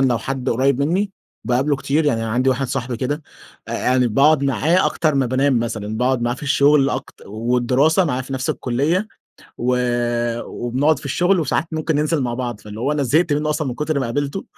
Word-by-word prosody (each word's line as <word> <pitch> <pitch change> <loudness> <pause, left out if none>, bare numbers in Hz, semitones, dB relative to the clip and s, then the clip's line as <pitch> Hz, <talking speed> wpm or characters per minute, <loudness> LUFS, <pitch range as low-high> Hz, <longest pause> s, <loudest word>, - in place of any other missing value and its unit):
لو 125 -4 +2
حد 135 +3 -4
قريب 135 +3 +1
مني 190 +7 0 0.3
باقابله 135 +4 +1
كتير، 140 +3 0
يعني 115 -6 +1
عندي 120 +4 0
واحد 130 +1 +1
صاحبي 125 -1 -3
كده، 145 +5 -3 0.5
آآ - - -4
يعني 125 0 +2
باقعد 140 +5 +4
معاه 150 +7 +2
أكتر 155 -3 0
ما 135 -2 +2
بانام 130 0 +2
مثلًا، 110 -2 -3
باقعد 125 -1 +1
معاه 120 0 0
في 130 - -13
الشغل، 140 0 +3
أكت 130 +2 -6
والدراسة 125 - +2
معاه 130 -5 -1
في 135 - -8
نفس 130 -1 -1
الكلية، 155 - -1 0.5
و 125 +1 +1 0.7
وبنقعد 135 +5 0
في - - -13
الشغل، 175 +6 +2
وساعات 150 +1 0
ممكن 160 0 -1
ننزل 150 -1 +1
مع 120 -1 -2
بعض، 120 -4 -4
فاللي 105 +1 -9
هو 140 +4 0
أنا 145 -1 0
زهقت 155 +5 +2
منه 150 +1 0
أصلًا 150 -2 -1
من 120 - -3
كتر 150 0 -1
ما 130 - -1
قابلته، 145 +9 -3
135 Hz, 200 wpm, -20 LUFS, 125-150 Hz, 0.7 s, باقعد